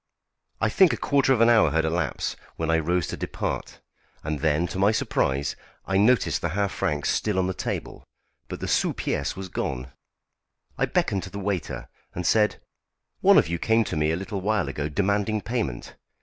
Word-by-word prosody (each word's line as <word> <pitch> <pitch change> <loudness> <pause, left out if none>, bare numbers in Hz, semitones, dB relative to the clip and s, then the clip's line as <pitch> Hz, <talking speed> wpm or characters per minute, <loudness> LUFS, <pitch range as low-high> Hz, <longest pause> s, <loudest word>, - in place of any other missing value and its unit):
I 115 - +2
think 180 - +5
a - - -2
quarter 140 -2 +2
of 125 -4 +3
an 115 - +6
hour 110 -9 +5
had 80 +1 +1
elapsed, 85 +2 -1 0.2
when 80 0 -1
I 80 - +3
rose 85 +1 0
to - - -3
depart, - - -4 0.4
and 75 -1 -2
then, 80 +2 +2
to 95 - -4
my 100 +2 +4
surprise, 70 -9 0 0.3
I 95 - 0
noticed 115 +5 +3
the 85 - -1
half 100 -1 +1
franc 75 -1 -1
still 105 -3 0
on 95 - +2
the 95 - -1
table, - - -5 0.4
but - - -7
the - - -3
sous - - +1
piece - - -2
was 95 0 -6
gone. 65 -6 -4 0.8
I - - 0
beckoned 95 - 0
to 100 - -7
a - - -3
waiter, 100 -3 -3 0.3
and 90 - -3
said: 105 +2 +3 0.6
"One - - +6
of - - +5
you 85 0 -2
came 115 +4 +3
to - - -4
me 75 0 +1
a 80 - +1
little 95 +1 -4
while 105 -3 +1
ago 70 +2 -3
demanding 100 +5 0
payment. 110 - -3
95 Hz, 195 wpm, -25 LUFS, 80-105 Hz, 0.8 s, an